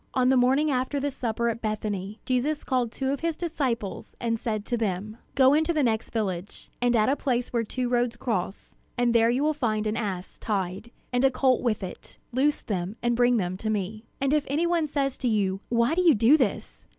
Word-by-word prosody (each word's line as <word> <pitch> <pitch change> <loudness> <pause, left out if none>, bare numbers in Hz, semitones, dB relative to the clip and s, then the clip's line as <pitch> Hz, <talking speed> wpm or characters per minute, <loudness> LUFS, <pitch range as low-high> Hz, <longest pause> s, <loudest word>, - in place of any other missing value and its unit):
On 255 -1 +3
the 265 - +4
morning 265 +4 +3
after 260 +2 0
the 285 +1 -1
supper 235 -2 -2
at 230 0 -2
Bethany, 210 -1 -3
Jesus 270 +4 0
called 250 -4 0
two 265 +2 -2
of 280 - -2
his 330 -1 -2
disciples, 260 - -3
and 230 -1 -1
said 215 -3 -2
to 240 - -1
them: 215 -1 -2 0.2
"Go 265 0 +6
into 315 +3 +2
the 305 -3 +2
next 225 -3 0
village, 195 -4 -4
and 245 0 +3
at 215 -1 +3
a 270 - +3
place 250 -4 -1
where 235 -1 +1
two 250 +3 -2
roads 240 -1 +1
cross; 200 -5 -3 0.2
and 245 -1 +2
there 230 -1 +5
you 250 +4 +1
will 310 +1 +2
find 220 -7 -1
an 215 0 0
ass 190 -6 -4
tied, 195 +1 -3 0.2
and 245 +1 +2
a 270 - +6
colt 260 -1 +2
with 220 -5 0
it. 185 - -9
Loose 275 +4 +1
them, 190 -1 -3
and 240 0 +2
bring 245 0 +4
them 185 -2 -2
to 215 +3 -3
me. 215 +2 -3
And 275 +1 +1
if 300 -1 +3
any 300 +5 +1
one 340 -2 +1
says 275 -2 -1
to 255 - -1
you, 195 -4 +1
'Why 235 +4 +2
do 360 - +2
you 335 -6 +6
do 230 +7 +6
this?' 225 -6 -2
240 Hz, 225 wpm, -26 LUFS, 215-270 Hz, 0.2 s, Go